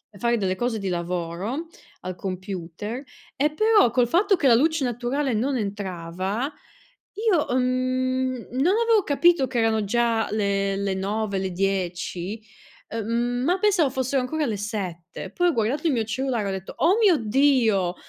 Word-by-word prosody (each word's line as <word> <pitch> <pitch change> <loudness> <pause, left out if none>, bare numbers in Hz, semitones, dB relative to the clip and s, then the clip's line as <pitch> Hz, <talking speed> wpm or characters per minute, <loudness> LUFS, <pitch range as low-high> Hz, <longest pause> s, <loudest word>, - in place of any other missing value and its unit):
e 200 - -12
fare 235 +3 +1
delle 190 -2 -1
cose 240 0 -1
di 200 -2 -3
lavoro, 180 - -3 0.3
al 185 +1 -4
computer, 190 +4 -5 0.3
e 295 +3 +2
però 430 - +4
col 245 -1 +2
fatto 390 - +3
che 290 - 0
la 240 - +7
luce 315 +3 +2
naturale 250 +3 -1
non 260 +5 0
entrava, 195 - -3 0.6
io, 405 -7 +1
ehm, 250 +1 +1
mhmm, 255 0 -1
non 290 +10 +2
avevo 455 -3 +4
capito 295 0 +3
che 255 -1 -3
erano 220 -1 +2
già 230 +1 +1
le 200 -2 0
le 195 0 -1
9, 200 +1 -2
le 190 0 -1
10, 185 +2 -2 0.5
ehm, 235 +2 -1
ma 355 +6 +2
pensavo 380 -7 +3
fossero 260 +1 0
ancora 310 +5 -1
le 220 -4 -2
7, 190 -3 -5
poi 355 0 +2
ho - - +2
guardato 245 +8 0
il 305 - +3
mio 225 -2 0
cellulare 240 0 -2
e - - -1
ho - - -1
detto: 190 0 -6
"Oh 360 +5 +5
mio 385 -6 +6
Dio!" 225 -6 +2
235 Hz, 170 wpm, -24 LUFS, 195-270 Hz, 0.6 s, la